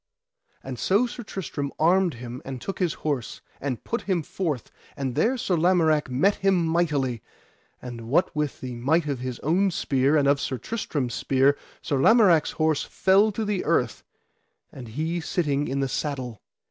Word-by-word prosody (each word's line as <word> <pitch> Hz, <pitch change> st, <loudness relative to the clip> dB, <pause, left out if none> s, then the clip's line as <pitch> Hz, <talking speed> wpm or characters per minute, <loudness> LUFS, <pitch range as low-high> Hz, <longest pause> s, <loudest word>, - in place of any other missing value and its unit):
And 130 Hz, -3 st, -6 dB
so 205 Hz, +6 st, +3 dB
Sir 240 Hz, 0 st, -6 dB
Tristram 160 Hz, -9 st, -5 dB
armed 175 Hz, 0 st, +3 dB
him 120 Hz, +1 st, -8 dB
and 130 Hz, -1 st, -6 dB
took 195 Hz, -, -5 dB
his 180 Hz, -4 st, 0 dB
horse, 140 Hz, -7 st, -2 dB, 0.2 s
and 130 Hz, -4 st, -3 dB
put 235 Hz, -, -2 dB
him 185 Hz, -5 st, -1 dB
forth, 150 Hz, -, -3 dB, 0.3 s
and 135 Hz, -2 st, -2 dB
there 245 Hz, -, +2 dB
Sir 190 Hz, -6 st, 0 dB
Lamorak 160 Hz, -4 st, +3 dB
met 165 Hz, +11 st, +2 dB
him 190 Hz, -3 st, +2 dB
mightily, 150 Hz, -8 st, 0 dB, 0.6 s
and 115 Hz, -2 st, -7 dB
what 165 Hz, +5 st, +2 dB
with 150 Hz, -2 st, -2 dB
the 125 Hz, -1 st, -5 dB
might 145 Hz, +8 st, +1 dB
of 140 Hz, -4 st, -2 dB
his 125 Hz, -1 st, -4 dB
own 185 Hz, +6 st, +2 dB
spear, 140 Hz, -3 st, +1 dB
and 140 Hz, -2 st, +3 dB
of 140 Hz, 0 st, +3 dB
Sir 130 Hz, -, -2 dB
Tristram's 140 Hz, -, -3 dB
spear, 135 Hz, +3 st, +2 dB, 0.3 s
Sir 145 Hz, -, 0 dB
Lamorak's 180 Hz, -, +5 dB
horse 155 Hz, -2 st, +1 dB
fell 195 Hz, +3 st, +3 dB
to 220 Hz, +2 st, -2 dB
the 205 Hz, -3 st, -1 dB
earth, -, -, 0 dB, 0.7 s
and 125 Hz, -3 st, -9 dB
he 160 Hz, +9 st, -2 dB
sitting 150 Hz, -4 st, -1 dB
in 140 Hz, +1 st, -1 dB
the 135 Hz, -, +1 dB
saddle. 130 Hz, -5 st, -4 dB
150 Hz, 170 wpm, -25 LUFS, 130-180 Hz, 0.7 s, Lamorak's